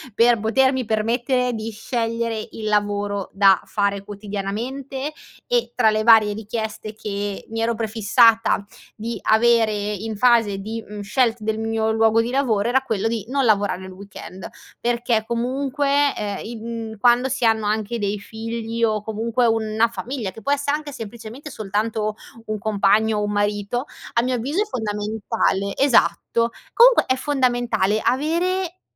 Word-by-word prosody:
per 235 0 +4
potermi 260 +4 +2
permettere 240 +4 0
di 220 0 -4
scegliere 230 0 -2
il 220 - -7
lavoro 205 -1 -1
da 195 -1 +5
fare 200 -1 -1
quotidianamente, 220 +8 -5 0.4
e 485 -1 0
tra 225 -3 +4
le 215 0 0
varie 220 -2 +6
richieste 220 0 -5
che 205 -2 -4
mi 225 - -4
ero 230 +1 +1
prefissata 225 0 +3 0.3
di 230 +2 -5
avere 225 0 +4
in 210 +1 -3
fase 230 -4 +3
di, 220 +3 -5
mhmm, 210 0 -7
scelte 230 +2 +1
del 220 0 -2
mio 225 0 0
luogo 225 0 +3
di 230 - -3
lavoro 235 -6 +1
era 265 +2 +3
quello 220 -4 -1
di 225 -3 -3
non 275 +1 +1
lavorare 205 -4 +1
il 190 - -9
weekend 190 -1 -10 0.3
perché 235 -2 0
comunque, 275 +4 0
ehm, 205 -2 -3
in 225 -1 -6
quando 245 +2 +4
si 260 -1 -2
hanno 220 -1 +2
anche 220 +2 -1
dei 205 0 -1
figli 225 +2 -5
o 215 -2 +2
comunque 225 +3 0
una 225 0 +2
famiglia, 235 -3 -5
che 225 - -12
può 280 - -1
esse 285 0 -2
anche 300 0 -3
semplicemente 230 +6 -8
soltanto 215 0 -2 0.3
un 215 -1 -3
compagno 215 +1 +2
o - - -1
un 205 - -1
marito, 205 +4 -1 0.3
a 235 - +3
mio 255 +1 0
avviso 275 - -1
è - - +1
fondamentale, 210 - -1
esatto, 235 -3 +2 0.2
comunque - - +6
è 260 - +2
fondamentale 245 -7 +1
avere 340 +7 0
225 Hz, 150 wpm, -22 LUFS, 210-245 Hz, 0.4 s, varie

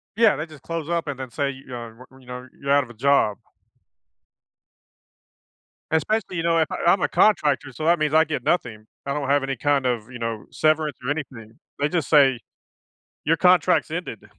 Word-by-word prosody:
Yeah, 225 -7 +4
they 155 +3 -4
just 155 -4 -15
close-up 165 0 -3
and 135 -2 -5
then 130 -2 -7
say, 140 +2 -1
you 135 0 -9
know, 120 -3 -8 0.2
y 130 - -18
you 125 - -20
know, 125 +1 -8
"You're 140 0 -2
out 140 -1 +4
of 120 - -12
a - - -12
job." 120 -4 +2 2.5
Especially, 185 +4 0
you 165 - -2
know, 165 0 +2
if 160 - +2 0.2
I'm 180 +1 +4
a - - +2
contractor, 145 -9 +2
so 155 - -5
that 170 -1 +3
means 155 0 0
I 160 - +6
get 155 -1 -4
nothing 115 -11 -1 0.2
I 140 - -2
don't 140 -2 -3
have 145 -1 +3
any 135 -1 -3
kind 140 +1 +1
of, 120 -2 -1
you 125 - -8
know, 115 -2 -4
severance 155 -2 +1
or 135 - -1
anything. 125 -7 -7 0.2
They 145 +1 0
just 165 -4 -1
say, 135 -5 +5 0.9
your - - +2
contract's - - +3
ended. - - -5
140 Hz, 195 wpm, -23 LUFS, 125-155 Hz, 2.5 s, I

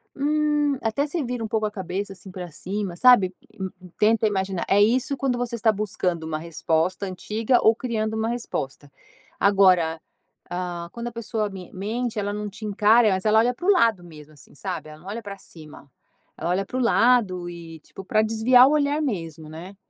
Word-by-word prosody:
hum, 295 0 +1
até 225 +6 0
você 320 +1 -2
vira 245 -2 -4
um - - -2
pouco 220 0 0
a 210 - -2
cabeça, 195 0 -4
assim, 190 0 -11
pra 180 -1 -7
cima, 190 +3 -4
sabe 200 -3 +5 0.6
tenta 220 +1 +3
imaginar. 190 -3 -2
É 200 - +5
isso 245 +6 +2
quando 265 -3 0
você 240 -1 -2
está 225 -1 +3
buscando 190 -5 -2
uma 160 -1 -3
resposta, 165 +3 -1
antiga 215 +6 0
ou 220 - +5
criando 220 -3 -2
uma 220 +1 -1
resposta. 145 - -5 0.5
Agora, 185 -5 +4 0.5
hã, 175 -1 -4
quando 235 0 -6
a - - -4
pessoa 225 -2 -3
me 190 -3 -10
mente 225 +5 -3
ela 205 0 -2
não 210 0 -4
te 215 +2 -9
encara, 215 +2 +4
mas 190 +1 -1
ela 215 +1 +5
olha 240 +2 +3
para 345 - -9
o - - +7
lado 230 - +3
mesmo, 155 -3 -13
assim, 145 -1 -18
sabe? 180 -1 -5
Ela 155 0 -12
não 180 - -15
olha 215 +4 -5
pra 200 -1 -7
cima. 155 -6 -13 0.5
Ela - - -3
olha 195 +2 0
para 255 - -5
o - - 0
lado 230 -7 +3
e, 165 -2 -10
tipo, 195 - -11
pra 215 - +2
desviar 225 +4 +5
o - - +2
olhar 295 0 +1
mesmo, 165 - -4
né. 170 +5 -9
210 Hz, 195 wpm, -24 LUFS, 180-235 Hz, 0.6 s, o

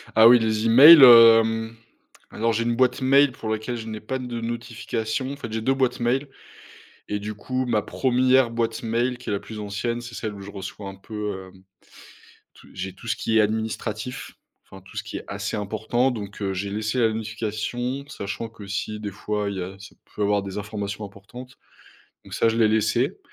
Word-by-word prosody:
Ah 110 +1 +8
oui, 125 +1 +8
les 110 0 0
emails, 140 +6 +10
hem, 115 -1 +7 0.5
alors 115 +1 -1
j'ai 115 - 0
une 120 0 0
boîte 130 +1 +2
mail 140 +1 +4
pour 115 -2 -7
laquelle 110 +3 -3
je 115 - -8
n'ai 110 -1 -5
pas 130 +5 -4
de 120 -2 -5
notifications, 115 +2 -4
en - - -6
fait, 115 -6 -8
j'ai 110 - -3
2 130 +4 +2
boîtes 130 -2 0
mail 125 +4 0 0.8
et 105 - -2
du 105 +1 -5
coup, 130 +5 -3
ma 115 -4 +1
1re 130 +1 +2
boîte 115 0 -2
mail, 120 +2 -1
qui 125 - -8
est - - -1
la 100 - -1
plus 110 +1 -9
ancienne, 115 +4 -3
c'est 120 0 -10
celle 110 -2 -4
où 100 - -10
je 100 +1 -9
reçois 100 0 -7
un 95 - -10
peu, 105 -2 -6
hem, 95 0 -20 0.9
tout - - -18
j'ai 95 0 -5
tout 115 +4 -12
ce - - 0
qui 110 0 0
est - - +6
administratif, 110 +2 -3 0.3
enfin, 95 - -14
tout 95 0 -16
ce - - -2
qui - - -7
est - - -7
assez 100 +2 -4
important, 110 +5 -1
donc 105 -3 -8
heu, 95 -1 -1
j'ai 100 +2 -4
laissé 110 +4 -2
la 115 -2 +3
notification, 110 +4 -4
sachant 105 +1 -5
que 110 -3 -12
si, 105 +2 -4
des 105 -1 -4
fois, 105 +1 -3
il 100 - -5
y 95 - -3
a 95 +2 -7
c'est 100 - -13 0.2
peut 105 - -3
avoir 100 0 +1
des 95 0 -7
informations 105 0 -5
importantes, 120 +6 -12 0.7
donc - - -11
ça, 115 - +2
je 115 - -2
l'ai 115 -2 +4
laissé 110 0 0
110 Hz, 210 wpm, -24 LUFS, 105-120 Hz, 0.9 s, emails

